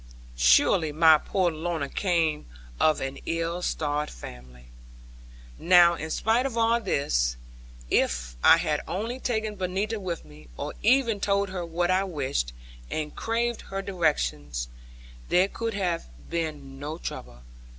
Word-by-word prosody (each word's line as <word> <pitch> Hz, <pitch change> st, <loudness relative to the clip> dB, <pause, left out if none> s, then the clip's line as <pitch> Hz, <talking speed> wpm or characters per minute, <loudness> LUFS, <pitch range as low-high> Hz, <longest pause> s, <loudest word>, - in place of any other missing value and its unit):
Surely 65 Hz, -, +4 dB
my 160 Hz, 0 st, +6 dB
poor 185 Hz, +1 st, 0 dB
Lorna 160 Hz, -2 st, -3 dB
came 165 Hz, -3 st, 0 dB, 0.3 s
of 155 Hz, -, +3 dB
an 135 Hz, +1 st, -4 dB
ill 165 Hz, +1 st, -1 dB
starred 150 Hz, -3 st, -1 dB
family. 60 Hz, 0 st, -12 dB, 0.9 s
Now 175 Hz, -1 st, +6 dB
in 160 Hz, -1 st, -5 dB
spite 230 Hz, +9 st, +1 dB
of 240 Hz, -3 st, -6 dB
all 230 Hz, +1 st, +3 dB
this, -, -, 0 dB, 0.5 s
if 60 Hz, -1 st, +1 dB
I -, -, +8 dB
had 150 Hz, -1 st, 0 dB
only 225 Hz, +7 st, -3 dB
taken 220 Hz, -4 st, -2 dB
Benita 195 Hz, +4 st, -2 dB
with 180 Hz, -4 st, -5 dB
me, 75 Hz, -2 st, -15 dB
or -, -, -4 dB
even 235 Hz, -2 st, +3 dB
told 200 Hz, 0 st, +1 dB
her 185 Hz, -1 st, -4 dB
what 175 Hz, +1 st, 0 dB
I 185 Hz, +1 st, +3 dB
wished, 135 Hz, -, -2 dB, 0.4 s
and 150 Hz, -1 st, -4 dB
craved 235 Hz, +1 st, -1 dB
her 195 Hz, 0 st, -3 dB
directions, 75 Hz, -, -1 dB, 0.6 s
there 185 Hz, +2 st, +4 dB
could 225 Hz, +1 st, -4 dB
have 180 Hz, -4 st, -1 dB, 0.2 s
been 150 Hz, -5 st, -4 dB
no 150 Hz, +3 st, -5 dB
trouble. -, -, -7 dB
170 Hz, 140 wpm, -26 LUFS, 140-195 Hz, 0.9 s, I